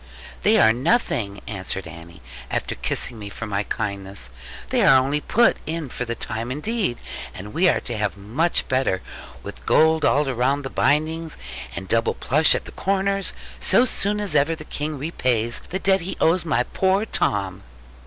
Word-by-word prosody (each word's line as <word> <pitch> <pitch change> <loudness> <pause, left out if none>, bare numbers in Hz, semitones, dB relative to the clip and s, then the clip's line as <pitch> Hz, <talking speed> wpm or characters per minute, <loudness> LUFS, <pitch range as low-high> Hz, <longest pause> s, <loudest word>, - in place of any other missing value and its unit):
'They - - +4
are 110 - +6
nothing,' 120 - 0
Annie 100 -3 -5
answered, 85 -2 -7 0.3
after - - -2
kissing 115 - -1
me 100 -1 -7
for 115 - -6
my 100 -2 -1
kindness: 100 - -4 0.4
'they 255 -2 +2
are 150 -10 +7
only 140 +3 0
put 235 +9 +3
in 160 -3 -3
for 125 - -4
the 120 0 -3
time 115 +2 -3
indeed; 185 - -1 0.4
and 105 +3 -8
we 180 +2 +4
are - - +2
to 120 - -5
have 105 -2 -2
much 125 - 0
better, 130 -8 0 0.4
with - - -9
gold 160 0 +4
all 145 +1 +3
round 135 +2 0
the 135 - -5
bindings, 155 +2 0 0.4
and 95 +2 -6
double 115 +3 +1
plush 150 +4 +4
at - - -3
the - - -9
corners; 195 0 0 0.3
so 250 - +5
soon 210 -4 0
as 205 -5 -1
ever 150 +2 +3
the 155 -1 -10
King 150 0 -4
repays 125 -6 0
the 185 - -2
debt 190 0 +2
he 180 +3 -5
owes 170 +3 +3
to - - -10
my 125 -5 +2
poor 190 - +1
Tom.' 100 - 0
135 Hz, 180 wpm, -23 LUFS, 105-165 Hz, 0.4 s, are